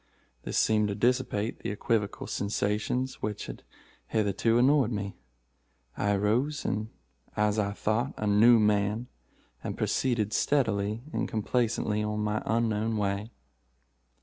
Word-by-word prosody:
This - - -3
seemed 105 -1 +3
to 100 - -2
dissipate 120 -1 0
the - - -4
equivocal 105 0 -1
sensations 105 +5 -1
which 105 -1 -3
had - - -8 0.5
hitherto 110 +2 +1
annoyed 130 -1 +4
me. 100 -2 -3 0.8
I 100 0 +1
arose, 120 +10 0 0.7
as 105 0 +2
I 100 -1 0
thought, 110 +6 -1
a 110 - -3
new 110 +4 +6
man, 105 +2 +1 0.5
and - - -4
proceeded 115 -5 0
steadily 110 -5 +1
and - - -1
complacently 110 -1 0
on 105 0 -2
my 105 0 -1
unknown 110 -1 +1
way. 100 +1 -1
105 Hz, 120 wpm, -28 LUFS, 105-115 Hz, 0.8 s, new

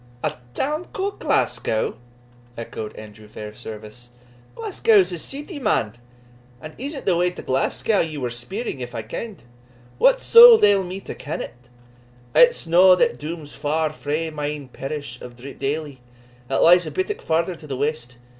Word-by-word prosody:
"A - - 0 0.2
town 305 +5 -2
ca'd 395 +1 -3
Glasgow!" 110 - 0 0.6
echoed 110 -2 -7
Andrew 105 0 -12
Fairservice. 110 +2 -10 0.5
"Glasgow's 225 - +3
a 175 - -5
ceety, 290 - -6
man. 110 - 0 0.6
And 155 0 -10
is't 275 +2 -6
the 185 - +3
way 175 +1 +2
to 180 - -10
Glasgow 135 +10 0
ye 155 -2 -2
were 125 -3 -3
speering 135 - -5
if 120 -1 -7
I 110 - -4
ken'd? 205 - -7 0.6
What - - +5
suld 470 -1 +9
ail 200 -2 +5
me 185 +2 -6
to - - -7
ken 150 - -6
it? 125 0 -10 0.6
it's - - +5
no 180 +3 +6
that 235 +5 +1
dooms 150 -1 -7
far 155 +1 -1
frae 155 +2 -3
my 150 -1 -3
ain 145 -3 -6
parish 135 -2 -6
of 120 -1 -10
Dreepdaily, 140 +2 -5 0.5
that 135 - +1
lies 175 +1 +6
a - - -5
bittock 380 +2 -3
farther 165 +3 0
to 155 -2 -13
the 135 -3 -4
west. 130 -4 -3
155 Hz, 160 wpm, -22 LUFS, 125-205 Hz, 0.6 s, suld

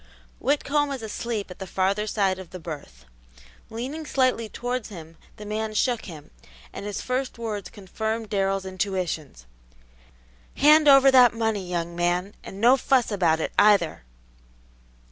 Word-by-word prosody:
Whitcomb 290 +1 +1
was 270 -4 -5
asleep 220 -2 -4
at 180 - -11
the 190 - -6
farther 195 +3 0
side 195 -3 0
of 185 -3 -11
his 185 - -9
berth. 140 - -9 0.6
Leaning 275 +7 -6
slightly 255 -5 +1
towards 245 0 -4
him, 165 -4 -11 0.2
the 210 - -9
man 215 +1 -3
shook 240 +1 0
him, 160 -6 -11 0.4
and 200 - -6
his 205 - -4
first 255 0 -2
words 215 -3 -5
confirmed 220 +2 -5
Darrell's 195 -1 0
intuitions, 185 - -4 1.1
"Hand 305 +1 +6
over 275 -1 +7
that 250 -3 +6
money, 220 -5 -2
young 170 -1 -3
man, 175 +3 -1
and 195 - -9
no 245 +5 +5
fuss 255 -2 +1
about 170 -6 +2
it, - - -2
either!" 205 -6 +4
210 Hz, 145 wpm, -25 LUFS, 185-245 Hz, 1.1 s, over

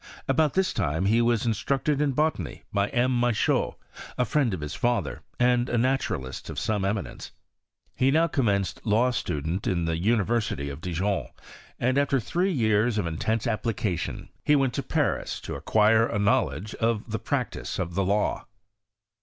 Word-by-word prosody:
About 155 -2 +2
this 190 0 +2
time 80 +6 0
he 115 +4 +4
was 120 -1 +2
instructed 135 +6 0
in 145 -2 +1
botany 150 - -1
by 100 0 +1
M. 125 +1 +1
Michault, 120 -3 +1 0.4
a 125 - +2
friend 130 +1 +1
of 95 - -3
his 75 0 -4
father, 100 - -1 0.2
and 125 0 +3
a 120 - 0
naturalist 110 - -1
of - - -6
some 105 -2 0
emi 100 +1 0
nence. - - -9 0.7
He 130 - +3
now 160 +4 +4
commenced 100 - 0
law 115 +4 +3
student 80 - -2
in 85 -3 0
the 80 0 0
University 105 -7 0
of 70 +3 -9
Dijon; 90 -3 -1 0.5
and, 130 +3 +2
after 140 -1 +2
three 175 - 0
years 110 - +2
of 105 - 0
in 80 -1 -4
tense 110 +1 0
application, 110 -5 -2
he 150 - +4
went 135 -3 +2
to - - -1
Paris - - -1
to - - -6
acquire 110 +1 +3
a - - -2
knowledge 100 - +1
of 115 -1 -1
the 110 - -1
practice 125 +3 -3
of 90 -3 -3
the 95 +2 +1
law. 100 +3 0
110 Hz, 170 wpm, -26 LUFS, 95-125 Hz, 0.7 s, he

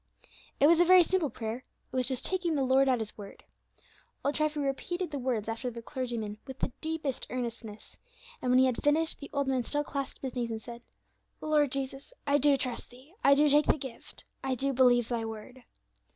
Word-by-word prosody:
It 280 - +6
was 330 +2 +6
a - - +7
very 365 0 +7
simple 350 -3 0
prayer; 225 -1 -4 0.3
it - - -8
was 255 -1 +2
just 260 -2 -1
taking 360 -4 +1
the 275 - +1
Lord 265 +1 +4
at 255 - +3
His 220 -2 -5
word. 200 -1 -10 0.8
Old 285 - +2
Treffy 305 0 0
repeated 305 +6 -2
the 285 - -3
words 245 -5 -1
after 225 +3 -3
the 235 -1 -8
clergyman 235 -6 -4
with 265 -1 -7
the - - -2
deepest 315 -4 -3
earnestness, 230 -3 -6 0.4
and 250 - -1
when 250 - +5
he 260 - +6
had 255 -2 0
finished 315 +2 +1
the 285 - -9
old 280 -1 -1
man 260 -2 +1
still 290 +5 -1
clasped 275 -1 -5
his 260 -2 -3
hands 240 -2 -2
and 225 -1 -3
said, 235 +1 -10 0.5
"Lord 300 -3 +2
Jesus, 275 - -4
I 285 0 +3
do 285 -1 +4
trust 250 -2 -3
Thee, 260 +7 -17
I 280 - +7
do 295 +2 +4
take 295 +1 +5
the - - +4
gift, 260 -4 -10 0.2
I 265 -1 0
do 275 +2 -1
believe 245 -2 +4
Thy 235 -2 -2
word." 225 +3 -8
265 Hz, 210 wpm, -30 LUFS, 240-290 Hz, 0.8 s, a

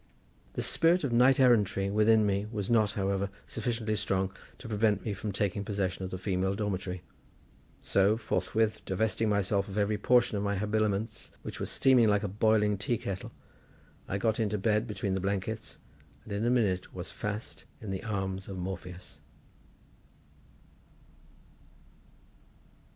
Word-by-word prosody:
The - - -2
spirit 170 +2 +3
of 135 -4 -1
knight 125 +3 +5
errantry 105 -6 +3
within 110 +1 +4
me 100 +1 0
was 105 -1 -3
not, 110 -3 +3
however, 100 0 -1 0.2
sufficiently 115 -3 -2
strong 95 -2 -1 0.2
to 125 - -10
prevent 105 -2 +1
me 105 - -1
from 105 +2 -4
taking 100 0 -1
possession 95 -2 -2
of 95 - -3
the 95 - -4
female 95 0 -1
dormitory; 95 -3 -3 0.8
so, 100 +3 +3
forthwith 110 -1 0
divesting 110 +3 0
myself 100 -1 +1
of 100 0 -6
every 105 0 +1
portion 120 0 +3
of - - -2
my 100 -1 0
habiliments, 105 +1 -1
which - - -6
were - - -2
steaming 125 -4 +4
like 105 0 +2
a - - 0
boiling 105 0 +2
tea 120 +2 0
kettle, 95 -2 -5 0.8
I 100 - -1
got 110 +2 0
into 105 -2 0
bed 105 +3 +1
between 105 -3 -2
the 95 - -1
blankets, 100 +3 -3 0.5
and 105 - -7
in 100 +2 -1
a - - +4
minute 105 -7 +1
was 90 0 -5
fast 105 +1 -5
in 105 -3 -6
the 95 - -3
arms 95 -3 -3
of 95 - -6
Morpheus. 90 0 -7
105 Hz, 150 wpm, -30 LUFS, 95-110 Hz, 0.8 s, knight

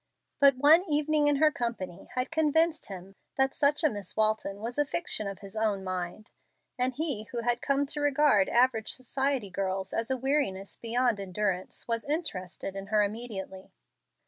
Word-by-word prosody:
But 280 -2 +6
one 305 +6 +7
evening 300 0 +2
in 290 - +4
her 305 +2 +4
company 230 -10 -5
had 255 +3 0
convinced 320 +1 +2
him 190 0 -9 0.2
that 265 0 +2
such 295 +3 +2
a - - +6
Miss 205 -2 -8
Walton 215 -2 0
was 235 +6 -5
a - - +5
fiction 285 -7 -1
of 195 -1 -7
his 195 +2 -12
own 215 -3 0
mind, 185 +2 -5 0.4
and 255 0 +1
he 285 -9 -1
who 235 +1 -5
had 240 0 0
come 280 0 +1
to 295 +1 -3
regard 290 -8 +3
average 240 -3 +2
society 265 -4 -1
girls 190 0 -3
as 225 +2 -2
a 260 - 0
weariness 255 -8 -1
beyond 240 -1 0
endurance 190 -1 -3
was 230 -1 -1
interested 195 - -3
in 195 0 -6
her 210 0 +3
immediately. 200 -3 -5
235 Hz, 170 wpm, -28 LUFS, 195-285 Hz, 0.4 s, one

